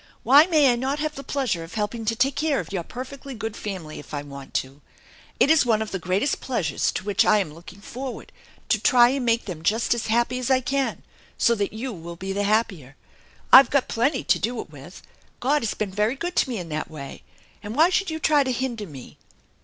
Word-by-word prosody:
Why 285 +7 +7
may 300 -7 +4
I - - 0
not 265 +4 -2
have 305 0 -2
the 275 - -8
pleasure 250 -12 -2
of 165 +6 -11
helping 220 +2 -3
to 225 +1 0
take 265 +4 +1
care 305 -3 0
of 175 -2 -7
your 185 - -1
perfectly 265 +7 -8
good 220 0 -5
family 185 -9 -6
if 150 - -8
I 145 - -4
want 140 -1 -11
to? 135 +2 -3 0.6
It 290 - +5
is 320 - +5
one 225 -4 +2
of 220 -1 -4
the 190 - -3
greatest 190 - -1
pleasures 175 - -1
to - - -4
which 200 -1 +2
I - - +4
am 180 -7 -2
looking 175 +4 -13
forward, 255 +4 -7 0.4
to 215 - +2
try 240 +1 +6
and 270 0 -1
make 230 -1 +1
them 175 -6 -6
just 220 +9 +1
as 235 - -3
happy 240 +3 +1
as 255 - -3
I 260 -1 +4
can, 270 +1 -2 0.3
so 235 - +3
that 205 -3 -1
you 240 +3 -5
will 170 -1 -8
be 190 +3 -5
the 200 +1 -1
happier. 200 - -1 0.6
I've 265 -2 +10
got 280 -2 +1
plenty 245 +7 0
to - - +2
do 235 +1 -2
it - - -7
with. 150 +5 -12 0.4
God 290 +4 +1
has 225 - -2
been 210 -3 -3
very 210 +5 0
good 350 +5 -4
to - - +3
me 240 - -3
in 175 -3 -6
that 155 0 -4
way, 140 -3 -9 0.4
and 210 +2 -6
why 325 +5 +5
should 380 0 +1
you 315 - -3
try 300 -2 +3
to 260 - -2
hinder 240 -4 -3
me 135 -5 -12
225 Hz, 235 wpm, -24 LUFS, 185-265 Hz, 0.6 s, I've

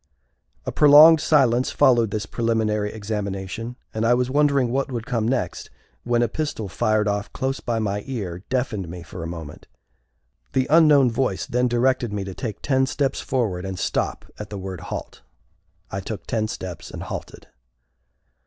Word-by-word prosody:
A - - -2
prolonged 150 +2 +8
silence 130 -6 +3
followed 120 -6 +4
this 105 -1 -3
preliminary 110 -2 0
examination 105 +2 -4 0.2
and 110 - -2
I 120 +2 +4
was 125 +1 0
wondering 140 -4 +3
what 135 +1 -1
would 120 -2 -4
come 115 -4 -1
next, 130 +1 -2 0.4
when 120 0 +2
a - - +2
pistol 145 -9 -3
fired 110 +1 +1
off 105 0 -2
close 135 0 -2
by 115 -1 -2
my 105 -2 -1
car 100 -9 -5
deafened 120 -8 -2
me 90 0 -8
for 90 0 -9
a 80 - -4
moment. 80 -3 -8 0.9
The 130 - +2
unknown 150 -6 +6
voice 115 -5 -1
then 125 +1 +1
directed 120 -1 +1
me 100 -1 -3
to 95 -1 -6
take 110 +3 -6
ten 130 -1 +2
steps 140 -1 -1
forward 105 -9 -1
and 95 -1 -5
stop - - -2
at 105 -1 -7
the 105 - -6
word 95 -2 -6
halt. - - -7 0.7
I 95 - -3
took 100 +2 -6
ten 110 -1 -1
steps, 90 -5 -7
and - - -7
halted. - - -8
115 Hz, 170 wpm, -23 LUFS, 100-130 Hz, 0.9 s, prolonged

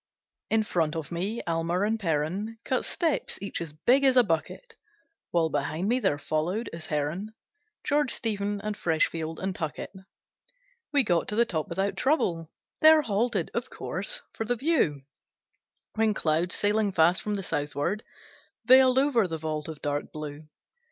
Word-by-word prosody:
In 220 0 +3
front 165 -6 0
of 160 -1 -5
me 195 +7 -2
Almer 170 +2 0
and 220 +2 0
Perren 185 +6 -2
Cut 260 - -1
steps, 325 -4 0
each 200 -2 -4
as 165 -3 -5
big 245 - +2
as 265 -1 +5
a 250 - +8
bucket; 220 - -3 0.6
While 165 -2 +2
behind 155 +5 -1
me 250 +2 +3
there 145 - +1
followed, 165 +10 -2
as 165 -1 -5
Herren, 165 +9 -3 0.5
George, 290 -3 +1
Stephen, 205 -2 -1
and 210 0 -3
Freshfield, 160 -2 -1
and 190 0 -3
Tuckett. 155 -2 -4 1.0
We 285 -3 +4
got 175 -6 +1
to 210 - -1
the 235 +2 +4
top 160 -8 -2
without 195 +1 -1
trouble; 170 - +1 0.3
There 315 0 +7
halted, 210 - 0
of 240 +2 -3
course, - - -2
for - - -3
the 245 +2 0
view; 240 - +1 0.9
When 220 -1 +1
clouds, 165 +2 +1
sailing 205 0 +2
fast 170 +1 +4
from 210 -1 -2
the 195 - -4
southward, 150 +7 -2 0.6
Veiled 260 0 +6
over 265 -7 +3
the 165 -2 -4
vault 155 -1 -4
of 160 -2 -8
dark 145 -1 -2
blue. 150 0 -7
195 Hz, 160 wpm, -27 LUFS, 160-230 Hz, 1.0 s, a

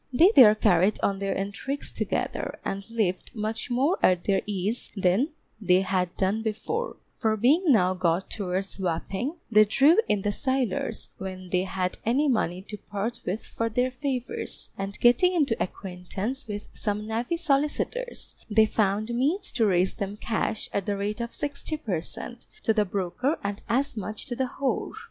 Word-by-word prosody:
They 330 +10 +6
there 215 -5 +9
carried 185 0 +3
on 195 -1 +1
their 195 0 -1
intrigues 205 +9 -3
together, - - -2
and 195 +2 -4
lived 215 -1 -1
much 215 +2 -3
more 270 +9 +2
at 180 -1 +4
their 195 -1 +2
ease 205 +3 -2
then 195 - +2 0.3
they 185 -2 +4
had 185 -2 -1
done 200 +3 +1
before; 230 - -2 0.2
for 220 -2 +1
being 285 - +4
now 185 -10 +5
got 180 0 0
towards 190 -1 -3
Wapping, 190 - -2 0.2
they 215 -1 +8
drew 275 - +5
in 205 -2 +1
the 205 - +1
sailors 260 -3 -1
when 185 -1 -7
they 185 0 +2
had 185 -1 -2
any 265 +7 +2
money 185 -8 0
to 210 +1 -7
part 210 +4 -4
with 195 +5 -2
for 230 0 -2
their 250 +3 +1
favours, 255 -1 -3
and 195 +1 -5
getting 245 +10 +5
into 290 -9 +2
acquaintance 190 +8 -4
with 205 -1 -5
some 210 -1 -2
navy 230 +9 -1
solicitors, 330 - -1 0.2
they 220 +1 +5
found 215 +1 0
means 300 +12 +1
to 225 -3 +2
raise 185 -1 +2
them 200 +1 -4
cash, 220 0 -2
at 200 0 -1
the 205 -1 0
rate 210 +3 -2
of 235 0 -4
60 290 +2 -3
per 190 - -2
cent. 240 +7 -6 0.2
to 225 - +3
the 210 -1 +2
broker, 200 - -1
and 200 0 -3
as 270 +4 +1
much 215 0 -5
to 245 - -4
the 260 0 -1
whore. 275 -2 -1
215 Hz, 170 wpm, -27 LUFS, 195-255 Hz, 0.3 s, there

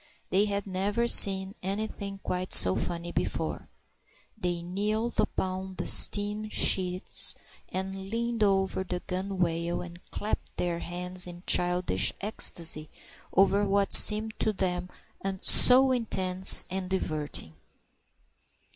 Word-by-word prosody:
They 195 +3 +1
had 200 -1 -4
never 200 +5 -3
seen 195 -3 +7
anything 200 0 -7
quite 180 0 -1
so 95 - +7
funny 170 0 -5
before. - - -5 0.7
They 175 -5 -5
kneeled 210 +6 -4
upon 185 0 -4
the - - -6
stern 210 +1 +4
sheets, 185 -3 +2 0.3
and 190 +1 -7
leaned 235 +1 -4
over 195 -2 -1
the 180 -1 -6
gunwale, 175 -3 -4
and 175 0 -14
clapped 210 +1 -6
their 170 -1 -3
hands 180 +1 -4
in 175 0 -12
childish 180 0 0
ecstasy 165 -6 -3 0.4
over 195 +2 +1
what 200 0 -1
seemed 215 +1 +6
to 220 - -1
them 180 -2 -4 0.5
so 260 +6 +7
intensely 190 -5 0
diverting. 155 - -5
190 Hz, 110 wpm, -26 LUFS, 180-205 Hz, 0.7 s, seen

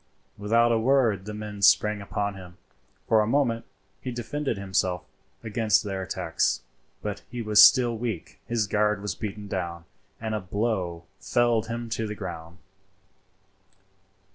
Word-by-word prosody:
Without 115 +3 +3
a 115 - +3
word 115 -6 +2
the 105 - -6
men 105 -1 -7
sprang 105 +1 +4
upon 100 +1 -2
him. 90 -2 -12 0.5
For 110 -1 +5
a 105 - 0
minute 115 -3 +1 0.4
he 130 - -4
defended 125 +1 -3
himself 95 -2 -1 0.4
against 110 -1 +2
their 95 -2 -3
attacks, 95 - -1 0.4
but 105 -1 -4
he 120 -1 -5
was 105 -1 +7
still 120 -2 +6
weak; 110 -6 -5
his 115 -2 +1
guard 105 0 +1
was 105 -4 -2
beaten 105 +2 -6
down, 85 -3 -4 0.3
and 110 -1 -3
a 110 - 0
blow 95 -3 -2 0.2
felled 115 +4 +1
him 115 +1 -4
to 110 0 -1
the 105 - -5
ground. 85 -2 -7
105 Hz, 145 wpm, -26 LUFS, 95-115 Hz, 0.5 s, was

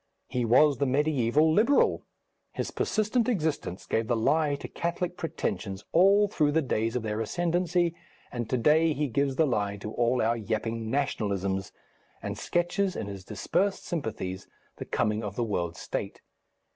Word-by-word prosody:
He 125 -2 -1
was 135 +4 +5
the 140 - +2
mediæval 145 +2 +2
Liberal; 235 - +3 0.5
his - - -3
persistent 220 +3 0
existence 155 - -2
gave 110 0 0
the 120 - +1
lie 145 +5 +2
to 140 - -7
Catholic 175 +1 -3
pretensions 105 - -3
all 195 +4 +5
through 150 -7 +1
the 160 - +3
days 115 -2 -1
of 125 - -1
their 110 0 -2
ascendency, 175 - 0 0.4
and 120 -2 -4
to 130 - +1
day 155 +6 +4
he 150 +1 -1
gives 140 +2 0
the 160 - +3
lie 105 -6 -1
to 105 +2 -6
all 120 +1 +1
our 115 +2 +2
yapping 115 +1 -3
"nationalisms," 100 -8 -1 0.5
and - - -4
sketches 180 +3 0
in - - -3
his 100 -2 -7
dispersed 115 - -1
sympathies 105 - -4 0.3
the - - -6
coming 105 +1 0
of 100 -1 -5
the 120 - 0
world 85 -6 -2
state. - - -5
130 Hz, 160 wpm, -28 LUFS, 110-165 Hz, 0.5 s, was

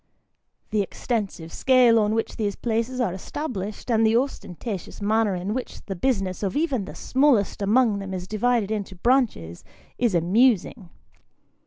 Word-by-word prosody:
The 210 -1 +2
extensive 195 -5 -3
scale 250 -3 +5
on 215 0 +1
which 225 - -2
these 205 -2 -1
places 230 +2 -2
are 230 -8 0
established, 210 - -5
and 225 -1 +3
the 225 +1 +4
ostentatious 225 - -4
manner 210 -1 +1
in 185 +4 -3
which 255 +1 -6
the 195 - -4
business 195 -4 -1
of 200 +6 -1
even 275 - 0
the - - -9
smallest 255 -8 +2
among 215 +1 +3
them 195 -1 -6
is 185 -1 -5
divided 215 0 0
into 205 -3 -3
branches, 210 - 0 0.4
is 235 -6 +2
amusing. 195 +2 +2
215 Hz, 150 wpm, -24 LUFS, 195-245 Hz, 0.4 s, scale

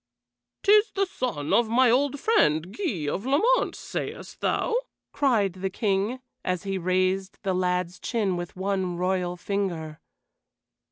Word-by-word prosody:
"'Tis 420 +2 +6
the 395 0 +2
son 240 - -3
of 235 -2 +4
my 245 +1 +5
old 285 +3 +2
friend, 175 - +2
Guy 210 - -2
of 185 +7 -2
Lamont, 365 - +2
sayest - - -6
thou?" - - 0 0.4
cried 225 -10 +2
the 190 +1 -3
King, 200 +5 0 0.2
as 180 -1 -1
he 195 -1 -2
raised 185 +2 0
the 190 - 0
lad's 180 -1 -1
chin 210 -6 0
with 175 0 -5
one 190 -2 -1
royal 180 0 -1
finger. 175 -6 -3
195 Hz, 135 wpm, -26 LUFS, 180-250 Hz, 0.4 s, Tis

